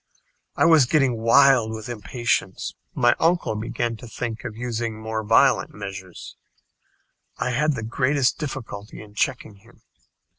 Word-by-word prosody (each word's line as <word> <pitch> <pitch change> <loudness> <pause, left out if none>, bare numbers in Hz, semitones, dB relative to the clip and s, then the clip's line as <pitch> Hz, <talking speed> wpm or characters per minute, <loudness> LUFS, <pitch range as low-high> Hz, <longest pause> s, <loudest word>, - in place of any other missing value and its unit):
I - - +3
was 160 -6 +6
getting 135 -5 +2
wild 120 0 +5
with 110 +1 -7
impatience. 110 -3 -2 0.2
My 120 -1 +4
uncle 165 -8 +1
began 115 +1 -3
to 120 - -11
think 115 0 -5
of 105 - -6
using 115 -2 -3
more 110 0 -3
violent 105 - +3
measures. 95 -2 -8 1.0
I 125 - -1
had 150 +5 +1
the 115 - -5
greatest 130 +4 +1
difficulty 115 -7 -6
in 105 -1 -12
checking 110 -2 -2
him. 115 +4 -22
115 Hz, 140 wpm, -23 LUFS, 110-130 Hz, 1.0 s, was